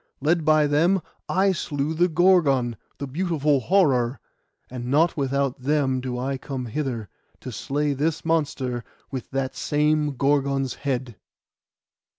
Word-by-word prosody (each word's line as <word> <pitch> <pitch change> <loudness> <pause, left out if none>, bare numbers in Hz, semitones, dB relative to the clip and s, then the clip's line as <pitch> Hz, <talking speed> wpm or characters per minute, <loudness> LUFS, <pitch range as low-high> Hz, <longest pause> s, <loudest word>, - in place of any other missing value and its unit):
Led 160 +4 +1
by 155 0 +4
them, 165 +7 +3 0.3
I 190 +1 +3
slew 150 -3 -2
the 175 +3 +3
Gorgon, 155 -9 +3 0.2
the 140 - -4
beautiful 150 -1 +1
horror; 130 - +2 0.5
and 125 -1 -6
not 155 +6 +3
without 140 -2 -1
them 135 -1 +1
do 125 -1 -4
I 135 +2 -2
come 130 -2 -5
hither, 120 -4 -3 0.3
to - - -6
slay 145 +1 -1
this 155 +4 -1
monster 140 -7 -1 0.3
with 130 -3 -5
that 135 0 -2
same 150 -1 +1
Gorgon's 140 -2 +1
head. 125 -5 -3
140 Hz, 135 wpm, -24 LUFS, 130-155 Hz, 0.5 s, by